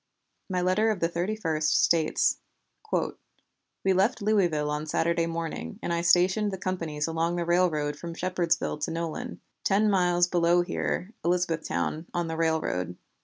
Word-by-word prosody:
My 180 Hz, -1 st, 0 dB
letter 185 Hz, +5 st, +2 dB
of 210 Hz, -4 st, 0 dB
the 165 Hz, -, +2 dB
31st 170 Hz, -2 st, -2 dB
states: 160 Hz, -2 st, +3 dB, 1.5 s
"We 190 Hz, -, +3 dB
left 195 Hz, +5 st, +2 dB
Louisville 175 Hz, -8 st, +1 dB
on 150 Hz, +1 st, -3 dB
Saturday 165 Hz, +2 st, +1 dB
morning, 165 Hz, -, -4 dB
and 170 Hz, -, -1 dB
I 170 Hz, -, 0 dB
stationed 185 Hz, +4 st, +3 dB
the 190 Hz, -, -4 dB
companies 165 Hz, -5 st, -2 dB
along 165 Hz, +1 st, -1 dB
the 175 Hz, -1 st, -1 dB
railroad 165 Hz, -4 st, +1 dB
from 170 Hz, +2 st, -7 dB
Shepardsville 175 Hz, -4 st, 0 dB
to -, -, -6 dB
Nolin, 170 Hz, +9 st, -4 dB, 0.2 s
ten 210 Hz, +2 st, +3 dB
miles 175 Hz, -2 st, +3 dB
below 175 Hz, 0 st, +3 dB
here 180 Hz, +3 st, -3 dB
(Elizabethtown) 170 Hz, -2 st, -1 dB
on 175 Hz, -1 st, 0 dB
the 160 Hz, -, -3 dB
railroad. 160 Hz, -, -1 dB
170 Hz, 145 wpm, -27 LUFS, 165-185 Hz, 1.5 s, states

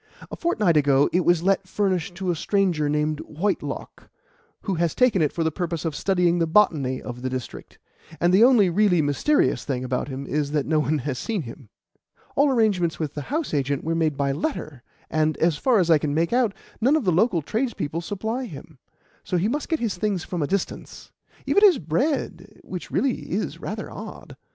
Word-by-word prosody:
A -, -, -4 dB
fortnight 210 Hz, -, +1 dB
ago 140 Hz, -1 st, +3 dB
it 180 Hz, +1 st, +3 dB
was 175 Hz, -1 st, +3 dB
let 195 Hz, 0 st, +1 dB
furnished 185 Hz, -3 st, -1 dB
to 185 Hz, 0 st, -1 dB
a -, -, -1 dB
stranger 175 Hz, -4 st, +1 dB
named 150 Hz, 0 st, 0 dB
Whitelock, 190 Hz, +7 st, -4 dB, 0.5 s
who 195 Hz, -, -2 dB
has 170 Hz, -2 st, 0 dB
taken 250 Hz, -8 st, +3 dB
it 150 Hz, -, +2 dB
for 165 Hz, -, -2 dB
the 160 Hz, -, +1 dB
purpose 170 Hz, 0 st, -3 dB
of 160 Hz, -2 st, -2 dB
studying 180 Hz, -1 st, +1 dB
the 165 Hz, -, +1 dB
botany 150 Hz, -8 st, +2 dB
of 125 Hz, 0 st, -8 dB
the 130 Hz, -, -2 dB
district; 130 Hz, -2 st, -7 dB, 0.4 s
and 175 Hz, +1 st, +2 dB
the 200 Hz, +4 st, +6 dB
only 240 Hz, -6 st, +6 dB
really 180 Hz, 0 st, +3 dB
mysterious 145 Hz, -, +1 dB
thing 130 Hz, -3 st, -3 dB
about 125 Hz, 0 st, -2 dB
him 135 Hz, 0 st, -6 dB
is 145 Hz, +1 st, -1 dB
that 150 Hz, -2 st, +1 dB
no 155 Hz, 0 st, +2 dB
one 150 Hz, +1 st, +1 dB
has 130 Hz, -2 st, -3 dB
seen 215 Hz, -7 st, -2 dB
him. 115 Hz, -1 st, -11 dB, 0.7 s
All 285 Hz, +1 st, +4 dB
arrangements 205 Hz, -, +1 dB
with 150 Hz, -3 st, -3 dB
the 145 Hz, -, -5 dB
house 310 Hz, -, -2 dB
agent 140 Hz, -1 st, 0 dB
were 165 Hz, -, -1 dB
made 160 Hz, -3 st, 0 dB
by 140 Hz, -1 st, +1 dB
letter, 150 Hz, -, -4 dB, 0.3 s
and, 155 Hz, 0 st, 0 dB
as 165 Hz, -2 st, +2 dB
far 250 Hz, -, +2 dB
as 175 Hz, -4 st, +2 dB
I 155 Hz, -, +6 dB
can 145 Hz, 0 st, -2 dB
make 165 Hz, +6 st, +1 dB
out, 240 Hz, -5 st, +2 dB, 0.3 s
none 265 Hz, +7 st, +4 dB
of 310 Hz, -, +1 dB
the 185 Hz, -, +2 dB
local 180 Hz, -1 st, +2 dB
tradespeople 215 Hz, -, -2 dB
supply 220 Hz, +8 st, -3 dB
him, 155 Hz, -, -11 dB, 0.4 s
so 180 Hz, -, -1 dB
he 180 Hz, +4 st, +1 dB
must 285 Hz, +6 st, -2 dB
get 320 Hz, -, 0 dB
his 220 Hz, -6 st, -2 dB
things 200 Hz, -4 st, -1 dB
from 175 Hz, -3 st, -4 dB
a 145 Hz, -, 0 dB
distance 195 Hz, +2 st, -4 dB, 0.3 s
even 405 Hz, -, +3 dB
his 380 Hz, -8 st, +7 dB
bread, 200 Hz, -, -2 dB
which 180 Hz, -2 st, -7 dB
really 270 Hz, -1 st, -1 dB
is -, -, -2 dB
rather -, -, -5 dB
odd. -, -, -9 dB
170 Hz, 205 wpm, -24 LUFS, 150-210 Hz, 0.7 s, his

